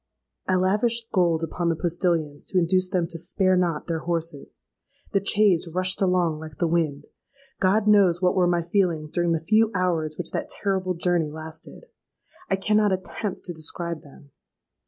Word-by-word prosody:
"I 185 - +2
lavished 220 +5 +1
gold 170 -3 +2
upon 170 +1 -1
the 165 - +1
postillions 165 -3 -1
to 190 - -2
induce 185 +1 +2
them 180 -3 0
to 165 0 -7
spare 185 +2 +1
not 175 -4 0
their 165 -2 -2
horses. 165 -3 -4 0.5
The 195 - +1
chaise 195 -4 +3
rushed 185 +3 0
along 180 -4 +1
like 155 -3 -10
the - - +1
wind. 160 -4 0 0.5
God 205 +3 +2
knows 195 -5 +5
what 180 0 +2
were 180 -2 +3
my 175 -1 +1
feelings 170 -4 0
during 175 -1 0
the 165 - +1
few 220 +2 +4
hours 165 -4 0
which 180 - -2
that - - -3
terrible 190 -2 -1
journey 170 -2 +1
lasted. 160 - -9 0.6
I 195 - +3
cannot 210 +1 +2
attempt 190 +1 -4
to 175 - -5
describe 165 +1 -4
them. 140 0 -17
175 Hz, 170 wpm, -24 LUFS, 165-185 Hz, 0.6 s, knows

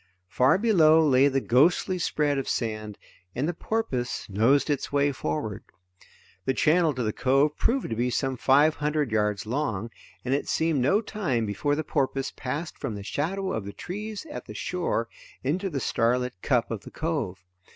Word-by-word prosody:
Far 130 - +4
below 160 -8 +5
lay 135 0 +5
the 135 -1 +1
ghostly 165 +9 +3
spread 145 -4 0
of 135 - -4
sand, 110 -3 -3 0.4
and 135 +5 0
the 175 - -1
porpoise 160 - -2
nosed 115 +8 +3
its 145 - -2
way 145 0 +2
forward. 80 - -3 0.8
The 130 - +1
channel 160 +4 +3
to 125 - -2
the 110 -1 -1
cove 135 +3 +2
proved 260 - 0
to - - 0
be 120 +2 0
some 135 +1 -1
five 145 +5 +4
hundred 150 -3 0
yards 105 -2 0
long, 115 -3 -2 0.3
and 130 - 0
it 140 - -1
seemed 160 -4 +1
no 195 - +3
time 155 - -1
before 145 +8 0
the 155 - -2
porpoise 135 -3 -1
passed 145 +6 -5
from 130 -7 -3
the 100 - -7
shadow 190 - -2
of 110 - -2
the 100 +1 -7
trees 210 - -6
at 295 - -7
the - - -10
shore 170 -10 -1 0.4
into 180 +9 -1
the 145 -5 -3
starlit 125 +1 0
cup 120 -6 +1
of 110 -3 -3
the - - -11
cove. 130 - -3
140 Hz, 180 wpm, -26 LUFS, 120-160 Hz, 0.8 s, below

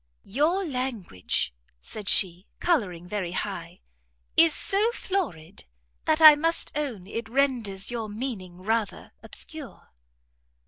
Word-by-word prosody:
"Your 315 - +1
language," 245 - -2 0.3
said 205 - -2
she, 180 -1 +3
colouring 185 - 0
very 185 -3 -3
high, 185 - -5 0.5
"is 330 0 +7
so 415 +8 +2
florid, 200 - -4 0.4
that 315 0 +2
I 310 -1 +11
must 330 +3 +1
own 260 -11 -3
it 225 +3 -5
renders 240 -7 0
your 225 -3 -4
meaning 205 -6 -6
rather 220 0 -2
obscure." 310 -6 -8
230 Hz, 110 wpm, -26 LUFS, 190-300 Hz, 0.5 s, I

